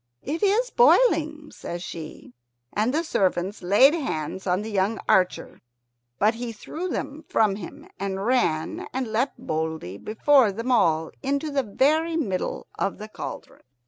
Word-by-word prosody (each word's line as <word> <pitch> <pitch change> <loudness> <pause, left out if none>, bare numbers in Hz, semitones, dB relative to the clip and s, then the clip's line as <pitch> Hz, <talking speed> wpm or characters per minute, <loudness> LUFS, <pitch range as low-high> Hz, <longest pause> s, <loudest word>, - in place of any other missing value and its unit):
"It 310 +5 -3
is 435 +5 +2
boiling," 320 -11 +3
says 175 +1 -6
she, 160 -8 -8 0.4
and 215 +4 +1
the 315 +4 0
servants 190 - 0
laid 205 - +6
hands 190 - -3
on 185 +3 +1
the 220 - -6
young 200 +2 0
archer; 185 -1 +1 0.6
but 210 +7 +3
he 235 +1 -5
threw 315 +11 -6
them 310 -3 -4
from 210 -3 +2
him, 280 - -10
and 195 0 -3
ran 175 -11 0
and 260 -1 -2
leapt 230 +6 -1
boldly 160 - -4
before 240 +1 +3
them 230 +6 -3
all 160 -9 +2
into 280 +2 -1
the 280 -1 +1
very 305 +9 +1
middle 195 - -2
of 195 - -1
the 215 +1 -8
cauldron. - - -8
225 Hz, 150 wpm, -25 LUFS, 190-295 Hz, 0.6 s, laid